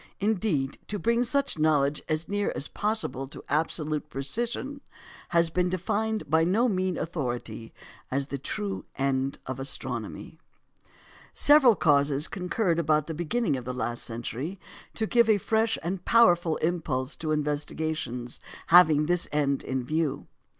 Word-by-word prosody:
Indeed, 195 Hz, -10 st, 0 dB
to 205 Hz, -, -3 dB
bring 235 Hz, +3 st, +1 dB
such 275 Hz, -, 0 dB
knowledge 150 Hz, -2 st, +2 dB
as 155 Hz, +1 st, 0 dB
near 205 Hz, 0 st, -1 dB
as 140 Hz, -, -2 dB
possible 205 Hz, -, -2 dB
to 140 Hz, -, -10 dB
absolute 150 Hz, 0 st, -1 dB
precision 235 Hz, -, -2 dB, 0.5 s
has 170 Hz, -1 st, +3 dB
been 180 Hz, +1 st, +1 dB
defined 215 Hz, +5 st, -1 dB
by 160 Hz, +2 st, +3 dB
no 205 Hz, +9 st, +2 dB
mean 185 Hz, -4 st, 0 dB
authority 120 Hz, -8 st, -4 dB, 0.4 s
as 135 Hz, +1 st, -1 dB
the 140 Hz, 0 st, -5 dB
true 200 Hz, +8 st, -4 dB
end 135 Hz, 0 st, 0 dB
of 130 Hz, 0 st, -5 dB
astronomy. 135 Hz, +1 st, -2 dB, 1.0 s
Several 290 Hz, -6 st, +6 dB
causes 145 Hz, -2 st, +3 dB
concurred 180 Hz, -1 st, -1 dB
about 155 Hz, -2 st, +2 dB
the 160 Hz, -, -5 dB
beginning 175 Hz, -, 0 dB
of 125 Hz, -2 st, -6 dB
the 125 Hz, 0 st, -4 dB
last 120 Hz, -1 st, -2 dB
century 120 Hz, -, -5 dB, 0.4 s
to 220 Hz, -, -1 dB
give 235 Hz, 0 st, +3 dB
a 215 Hz, -, +5 dB
fresh 220 Hz, +2 st, +1 dB
and 180 Hz, +2 st, -3 dB
powerful 175 Hz, -8 st, +4 dB
impulse 155 Hz, -5 st, -1 dB
to 155 Hz, -1 st, -3 dB
investigations 150 Hz, -4 st, -2 dB, 0.3 s
having 155 Hz, -4 st, +7 dB
this 175 Hz, +2 st, +1 dB
end 140 Hz, -2 st, 0 dB
in 130 Hz, -1 st, -2 dB
view. 155 Hz, +1 st, -1 dB
160 Hz, 145 wpm, -27 LUFS, 140-200 Hz, 1.0 s, having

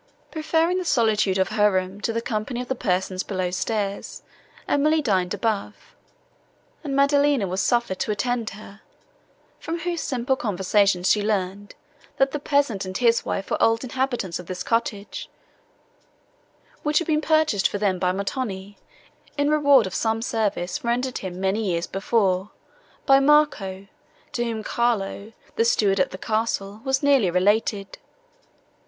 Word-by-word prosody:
]) -, -, -36 dB
Preferring 325 Hz, +3 st, +1 dB
the -, -, -3 dB
solitude 220 Hz, -, +2 dB
of 190 Hz, -1 st, +1 dB
her 210 Hz, 0 st, +3 dB
room 185 Hz, +1 st, -2 dB
to 230 Hz, -, -1 dB
the 230 Hz, +1 st, -2 dB
company 220 Hz, +3 st, -3 dB
of 250 Hz, -, -5 dB
the -, -, 0 dB
persons 185 Hz, -5 st, -1 dB
below 185 Hz, -3 st, -3 dB
stairs, 200 Hz, +1 st, -3 dB, 0.4 s
Emily 305 Hz, +2 st, +2 dB
dined 190 Hz, -10 st, 0 dB
above, 210 Hz, 0 st, -3 dB, 0.9 s
and 280 Hz, -3 st, -3 dB
Maddelina 280 Hz, -4 st, +3 dB
was 185 Hz, +1 st, -1 dB
suffered 235 Hz, -3 st, 0 dB
to -, -, -2 dB
attend 235 Hz, +2 st, -1 dB
her, 205 Hz, 0 st, -13 dB, 0.8 s
from 330 Hz, +1 st, -4 dB
whose 345 Hz, -1 st, -2 dB
simple 255 Hz, 0 st, -1 dB
conversation 200 Hz, -4 st, +1 dB
she 205 Hz, +3 st, +3 dB
learned, 205 Hz, -1 st, -2 dB, 0.4 s
that 270 Hz, 0 st, +3 dB
the 295 Hz, -, -3 dB
peasant 280 Hz, -8 st, +1 dB
and 185 Hz, 0 st, -4 dB
his 235 Hz, -2 st, +3 dB
wife 195 Hz, -, -4 dB
were -, -, 0 dB
old 225 Hz, +1 st, +3 dB
inhabitants 245 Hz, -8 st, -2 dB
of 180 Hz, -, -10 dB
this 180 Hz, -1 st, -5 dB
cottage, 230 Hz, -, -2 dB, 1.5 s
which 300 Hz, 0 st, +1 dB
had 340 Hz, -, +2 dB
been 310 Hz, -2 st, +1 dB
purchased 310 Hz, -11 st, +2 dB
for -, -, -4 dB
them 195 Hz, -3 st, 0 dB
by 180 Hz, 0 st, +1 dB
Montoni, 200 Hz, 0 st, -4 dB, 0.6 s
in 285 Hz, +1 st, +2 dB
reward 285 Hz, -6 st, +5 dB
of 190 Hz, -, -6 dB
some 225 Hz, 0 st, 0 dB
service, 205 Hz, -7 st, -2 dB
rendered 245 Hz, +2 st, -1 dB
him, 185 Hz, -1 st, -6 dB
many 195 Hz, +3 st, 0 dB
years 175 Hz, -4 st, -1 dB
before, 195 Hz, -1 st, 0 dB, 0.6 s
by 270 Hz, -1 st, +6 dB
Marco, 275 Hz, -10 st, +2 dB, 0.5 s
to 240 Hz, -, -1 dB
whom 225 Hz, -2 st, -3 dB
Carlo, 220 Hz, -3 st, -1 dB, 0.3 s
the -, -, +4 dB
steward 200 Hz, -4 st, +2 dB
at 185 Hz, -, +2 dB
the -, -, -8 dB
castle, 215 Hz, -1 st, -2 dB
was 265 Hz, +1 st, 0 dB
nearly 275 Hz, -9 st, +4 dB
related. 200 Hz, +2 st, 0 dB
220 Hz, 155 wpm, -24 LUFS, 195-265 Hz, 1.5 s, by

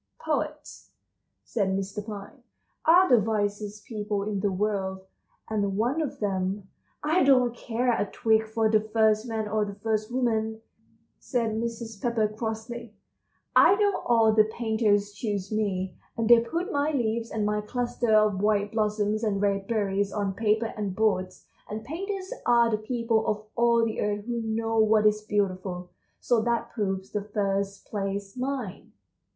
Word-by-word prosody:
"Poets," 305 Hz, -1 st, -4 dB, 0.5 s
said 200 Hz, -4 st, -1 dB
Mr. 195 Hz, +2 st, -4 dB
Pine, 215 Hz, +6 st, -9 dB, 0.4 s
"are 360 Hz, +4 st, +7 dB
the 245 Hz, -, +6 dB
wisest 205 Hz, -1 st, -2 dB
people 210 Hz, -2 st, -3 dB
in 205 Hz, -1 st, -2 dB
the 200 Hz, 0 st, 0 dB
world, 190 Hz, -1 st, -1 dB, 0.5 s
and 200 Hz, -3 st, -1 dB
one 250 Hz, +9 st, +1 dB
of 285 Hz, -2 st, -4 dB
them"— 195 Hz, -1 st, -2 dB, 0.4 s
"I 315 Hz, +5 st, +3 dB
don't 255 Hz, -3 st, +4 dB
care 240 Hz, +1 st, 0 dB
a 205 Hz, -, -1 dB
twig 220 Hz, -1 st, +2 dB
for 220 Hz, 0 st, +1 dB
the 215 Hz, 0 st, +4 dB
first 220 Hz, +1 st, +2 dB
man 220 Hz, -2 st, -2 dB
or 215 Hz, 0 st, +1 dB
the 200 Hz, -1 st, -5 dB
first 215 Hz, +1 st, -2 dB
woman," 220 Hz, -3 st, 0 dB, 0.6 s
said 235 Hz, -4 st, -1 dB
Mrs. 225 Hz, -1 st, -4 dB
Pepper 235 Hz, -3 st, +1 dB
crossly. 220 Hz, +1 st, -5 dB, 0.6 s
"I 390 Hz, -, +7 dB
know 405 Hz, -1 st, +2 dB
all 225 Hz, -2 st, +4 dB
the 215 Hz, 0 st, +5 dB
painters 220 Hz, -2 st, +1 dB
choose 205 Hz, -2 st, -3 dB
me, 190 Hz, -4 st, -1 dB, 0.2 s
and 230 Hz, -1 st, 0 dB
they 235 Hz, 0 st, +8 dB
put 335 Hz, -, -3 dB
my 285 Hz, +1 st, +1 dB
leaves 230 Hz, -4 st, -1 dB
and 215 Hz, -2 st, -1 dB
my 210 Hz, 0 st, 0 dB
clusters 240 Hz, +2 st, -2 dB
of 215 Hz, -3 st, +4 dB
white 205 Hz, -1 st, +2 dB
blossoms 215 Hz, 0 st, 0 dB
and 205 Hz, -3 st, 0 dB
red 200 Hz, -1 st, 0 dB
berries 200 Hz, -3 st, 0 dB
on 200 Hz, -2 st, -1 dB
paper 220 Hz, +2 st, 0 dB
and 205 Hz, -3 st, -3 dB
boards, 185 Hz, -4 st, 0 dB, 0.2 s
and 215 Hz, +1 st, -5 dB
painters 380 Hz, -, -4 dB
are 235 Hz, -1 st, +5 dB
the 215 Hz, -, +2 dB
people 230 Hz, 0 st, 0 dB
of 210 Hz, 0 st, -1 dB
all 235 Hz, -1 st, +4 dB
the 220 Hz, -, -2 dB
earth 205 Hz, 0 st, -1 dB
who 235 Hz, -1 st, -2 dB
know 225 Hz, 0 st, -1 dB
what 215 Hz, 0 st, +4 dB
is 210 Hz, 0 st, +3 dB
beautiful, 185 Hz, -4 st, -2 dB, 0.3 s
so 240 Hz, -3 st, +2 dB
that 235 Hz, +1 st, -1 dB
proves 195 Hz, -3 st, -3 dB
the 210 Hz, -, -1 dB
first 200 Hz, -1 st, -2 dB
place 195 Hz, -1 st, -4 dB
mine." 255 Hz, -6 st, -4 dB
215 Hz, 160 wpm, -27 LUFS, 205-235 Hz, 0.6 s, they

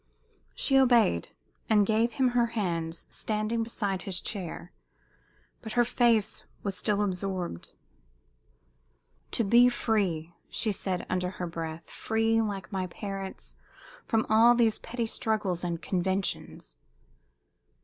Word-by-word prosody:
She 270 Hz, -1 st, +4 dB
obeyed, 235 Hz, -, +4 dB, 0.4 s
and 210 Hz, -2 st, +5 dB
gave 225 Hz, +3 st, +2 dB
him 260 Hz, -2 st, +2 dB
her 240 Hz, -1 st, +2 dB
hands, 165 Hz, -4 st, -2 dB
standing 215 Hz, +1 st, -1 dB
beside 205 Hz, -4 st, -2 dB
his 185 Hz, -2 st, -2 dB
chair. 180 Hz, -3 st, -5 dB, 0.9 s
But 220 Hz, -2 st, -6 dB
her 240 Hz, 0 st, +4 dB
face 230 Hz, -3 st, +2 dB, 0.2 s
was 200 Hz, -2 st, -2 dB
still 210 Hz, 0 st, +1 dB
absorbed. 185 Hz, -, -3 dB, 1.6 s
"To 230 Hz, -, +1 dB
be 235 Hz, +4 st, +6 dB
free," 185 Hz, -9 st, -1 dB, 0.2 s
she 220 Hz, -, 0 dB
said, 185 Hz, -2 st, -2 dB
under 180 Hz, 0 st, -1 dB
her 185 Hz, -1 st, -5 dB
breath 165 Hz, -1 st, -6 dB
"free, 225 Hz, 0 st, +1 dB
like 205 Hz, -3 st, -4 dB
my 190 Hz, -2 st, -2 dB
parents, 195 Hz, +1 st, -6 dB, 0.5 s
from 225 Hz, -1 st, +2 dB
all 230 Hz, +2 st, +6 dB
these 230 Hz, -3 st, +3 dB
petty 235 Hz, 0 st, -3 dB
struggles 210 Hz, -6 st, -1 dB
and 170 Hz, -1 st, -2 dB
conventions!" 185 Hz, -, -2 dB
205 Hz, 120 wpm, -28 LUFS, 180-225 Hz, 1.6 s, be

